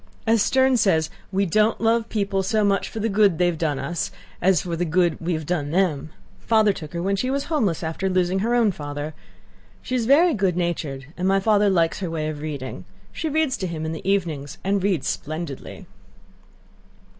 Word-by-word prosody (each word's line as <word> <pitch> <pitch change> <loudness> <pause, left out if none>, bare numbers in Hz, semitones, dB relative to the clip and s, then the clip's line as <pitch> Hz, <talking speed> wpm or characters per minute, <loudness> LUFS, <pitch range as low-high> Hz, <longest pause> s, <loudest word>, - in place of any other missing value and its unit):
As 225 -1 +3
Sterne 260 +3 +3
says: 160 -8 +2 0.2
'We 195 +1 +1
don't 215 +5 +2
love 230 0 +1
people 200 -2 0
so 210 +3 +1
much 200 -1 +1
for 225 - -6
the 220 - 0
good 200 -4 +3
they 180 - +3
have 175 -3 0
done 150 -4 0
us, 170 +4 -3 0.3
as 185 -3 +3
for 170 -2 -3
the 170 - -1
good 175 0 +1
we 170 +2 -1
have 155 -1 -3
done 150 -3 -1
them.' 165 -3 0 0.3
Father 220 -2 +3
took 155 -4 -9
her 170 0 -3
when 195 +1 +1
she 255 +6 -1
was 275 +1 0
homeless 215 - 0
after 160 +4 -2
losing 185 0 +1
her 230 +4 +1
own 230 -4 +4
father. 145 -1 -6 0.7
She - - -5
is 240 -3 0
very 320 +5 +5
good 190 -5 0
natured, 155 -6 -2
and 180 +1 0
my 195 0 +3
father 205 0 +3
likes 170 -4 +1
her 185 -4 -3
way 155 -2 -2
of 150 -1 -5
reading. 140 -10 -6 0.3
She 320 - -3
reads 310 -3 +1
to 185 - -3
him 160 -2 -4
in 160 - -2
the 160 +4 -4
evenings 160 -8 -1
and 195 +1 +1
reads 185 -7 0
splendidly." 155 -2 -5
185 Hz, 205 wpm, -23 LUFS, 160-215 Hz, 0.7 s, very